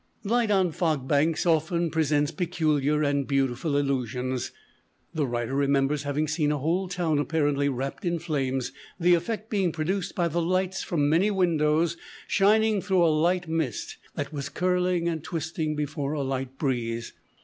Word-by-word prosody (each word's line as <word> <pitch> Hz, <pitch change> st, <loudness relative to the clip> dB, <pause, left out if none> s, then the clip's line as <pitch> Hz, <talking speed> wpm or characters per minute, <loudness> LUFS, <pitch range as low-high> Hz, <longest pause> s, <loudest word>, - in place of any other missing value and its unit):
Light 230 Hz, +1 st, +1 dB
on 190 Hz, -4 st, +3 dB
fog 155 Hz, -5 st, -1 dB
banks 155 Hz, +4 st, +2 dB
often 165 Hz, 0 st, +1 dB
presents 150 Hz, -2 st, +1 dB
peculiar 155 Hz, -3 st, +1 dB
and 140 Hz, -2 st, 0 dB
beautiful 135 Hz, +2 st, 0 dB
illusions. 130 Hz, -2 st, -1 dB, 0.6 s
The 150 Hz, -4 st, 0 dB
writer 120 Hz, +1 st, -2 dB
remembers 140 Hz, +1 st, +2 dB
having 145 Hz, +2 st, -1 dB
seen 150 Hz, -1 st, +1 dB
a 150 Hz, -, 0 dB
whole 170 Hz, +7 st, 0 dB
town 175 Hz, -5 st, 0 dB
apparently 145 Hz, -2 st, +1 dB
wrapped 135 Hz, +5 st, -4 dB
in 170 Hz, -2 st, 0 dB
flames, 135 Hz, -6 st, -2 dB, 0.3 s
the 175 Hz, +1 st, +5 dB
effect 215 Hz, +6 st, -1 dB
being 195 Hz, -5 st, +1 dB
produced 180 Hz, +4 st, -2 dB
by 175 Hz, -2 st, +1 dB
the 170 Hz, +1 st, -1 dB
lights 185 Hz, +2 st, 0 dB
from 150 Hz, -4 st, 0 dB
many 170 Hz, +7 st, +3 dB
windows 170 Hz, -4 st, +2 dB, 0.3 s
shining 215 Hz, +1 st, +3 dB
through 185 Hz, -3 st, +3 dB
a 160 Hz, -, +3 dB
light 175 Hz, +3 st, +1 dB
mist 160 Hz, -8 st, -2 dB, 0.2 s
that 145 Hz, +1 st, -4 dB
was 140 Hz, -2 st, -4 dB
curling 180 Hz, -1 st, +1 dB
and 160 Hz, -3 st, -2 dB
twisting 160 Hz, -2 st, -3 dB
before 145 Hz, -1 st, -2 dB
a 145 Hz, -2 st, -1 dB
light 135 Hz, 0 st, -3 dB
breeze. 120 Hz, -5 st, -2 dB
155 Hz, 160 wpm, -26 LUFS, 140-175 Hz, 0.6 s, the